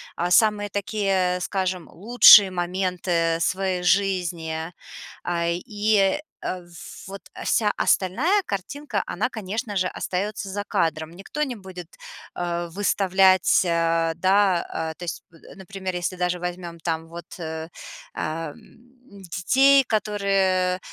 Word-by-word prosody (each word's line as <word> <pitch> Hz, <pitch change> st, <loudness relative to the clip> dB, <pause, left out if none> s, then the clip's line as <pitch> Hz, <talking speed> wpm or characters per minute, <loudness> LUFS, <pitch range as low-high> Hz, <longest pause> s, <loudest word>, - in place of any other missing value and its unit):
а 175 Hz, +1 st, -2 dB
самые 210 Hz, +1 st, +3 dB
такие, 195 Hz, -3 st, 0 dB
скажем, 185 Hz, -2 st, -2 dB
лучшие 210 Hz, 0 st, +7 dB
моменты 175 Hz, -2 st, -1 dB
своей 185 Hz, +1 st, -1 dB
жизни. 175 Hz, -3 st, 0 dB, 0.5 s
А, 170 Hz, -1 st, -1 dB
и, 205 Hz, +5 st, +1 dB, 0.2 s
э, 185 Hz, -, -3 dB, 0.5 s
вот 195 Hz, 0 st, -8 dB, 0.2 s
вся 210 Hz, -2 st, +2 dB
остальная 275 Hz, -, +2 dB
картинка, 205 Hz, +3 st, -4 dB
она, 230 Hz, +7 st, -1 dB
конечно 215 Hz, 0 st, -5 dB
же, 185 Hz, -1 st, +1 dB
остается 195 Hz, +3 st, -4 dB
за 205 Hz, +1 st, -4 dB
кадром. 160 Hz, -4 st, -1 dB
Никто 195 Hz, -, -7 dB
не 265 Hz, -4 st, -3 dB
будет, 190 Hz, -4 st, -10 dB, 0.5 s
э, 175 Hz, 0 st, -3 dB
выставлять, 190 Hz, -1 st, +3 dB
э, 165 Hz, -1 st, +1 dB
да, 190 Hz, 0 st, +3 dB
а 160 Hz, 0 st, -4 dB
то 180 Hz, -, -11 dB
есть, 170 Hz, -, -5 dB
м, 165 Hz, -, -16 dB
например, 190 Hz, -1 st, -6 dB
если 175 Hz, +1 st, -2 dB
даже 180 Hz, 0 st, -1 dB
возьмем 175 Hz, -1 st, -6 dB
там 160 Hz, 0 st, -3 dB
вот, 170 Hz, 0 st, -9 dB
э, 160 Hz, -1 st, -6 dB, 0.4 s
ам, 155 Hz, -1 st, -4 dB, 0.8 s
детей, 270 Hz, +9 st, +5 dB
которые, 195 Hz, -4 st, 0 dB
185 Hz, 120 wpm, -24 LUFS, 170-200 Hz, 0.8 s, лучшие